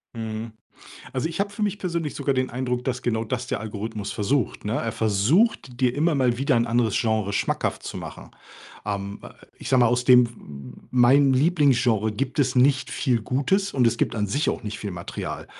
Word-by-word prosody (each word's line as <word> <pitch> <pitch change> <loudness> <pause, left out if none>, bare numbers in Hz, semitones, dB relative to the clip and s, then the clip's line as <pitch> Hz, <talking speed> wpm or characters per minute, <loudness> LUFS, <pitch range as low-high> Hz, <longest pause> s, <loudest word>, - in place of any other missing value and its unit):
Mhm. 110 0 -5 0.6
Also, 130 +4 -1
ich 165 - -6
habe 200 0 0
für 210 +1 -6
mich 205 -1 -1
persönlich 170 -5 -3
sogar 140 -1 0
den 130 0 0
Eindruck, 125 0 -2
dass 125 -1 -2
genau 110 -2 0
das 125 +2 -3
der - - -3
Algorithmus 110 0 -5
versucht, 120 +4 -1
ne? 105 +2 -1
Er 115 - -1
versucht, 120 - +1
dir 125 -1 +2
immer 155 +2 +1
mal 125 -3 +2
wieder 135 0 +1
ein 120 0 +2
anderes 115 -2 +1
Genre 110 -3 0
schmackhaft - - -1
zu - - -6
machen. - - -9 0.5
Ähm, 100 -1 -4
äh, - - -9 0.3
ich - - -7
sage 130 -2 +4
mal, 120 - +6
aus 125 +1 +1
dem 125 -1 +7
pf 115 - -12
hm, 70 - -11 0.2
mein 135 +3 +5
Lieblingsgenre 130 - +2
gibt 135 +5 -3
es 130 -1 +1
nicht 130 +2 +3
viel 125 -5 0
Gutes 190 - 0
und 125 -3 +3
es 115 0 +1
gibt - - 0
an 105 -1 0
sich 140 +10 0
auch - - -6
nicht 105 0 -5
viel 105 - -4
Material. 90 -1 -6
125 Hz, 210 wpm, -24 LUFS, 110-140 Hz, 0.6 s, dem